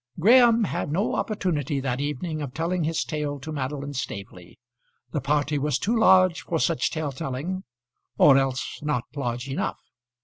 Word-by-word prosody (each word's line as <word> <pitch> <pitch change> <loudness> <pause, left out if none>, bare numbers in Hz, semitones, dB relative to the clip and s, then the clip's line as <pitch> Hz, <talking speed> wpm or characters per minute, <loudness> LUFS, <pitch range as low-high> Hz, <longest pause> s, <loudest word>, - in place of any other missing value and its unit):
Graham 235 +4 +6
had 165 - -2
no 190 +7 0
opportunity 155 - -1
that 130 -1 -2
evening 150 +2 -3
of 140 -3 -6
telling 170 +1 -1
his 165 +1 0
tale 150 -2 -3
to 155 +4 -7
Madeline 140 0 -4
Staveley. 100 -8 -7 0.5
The 150 - -2
party 145 +1 0
was 145 -1 0
too 225 +9 0
large 185 -5 +5
for 165 - -2
such 165 0 +1
tale 155 -3 -3
telling 160 +7 -4 0.5
or 140 - +7
else 135 -1 0
not 150 -5 -1
large 125 -2 -3
enough. 135 - -2
150 Hz, 160 wpm, -25 LUFS, 135-170 Hz, 0.5 s, or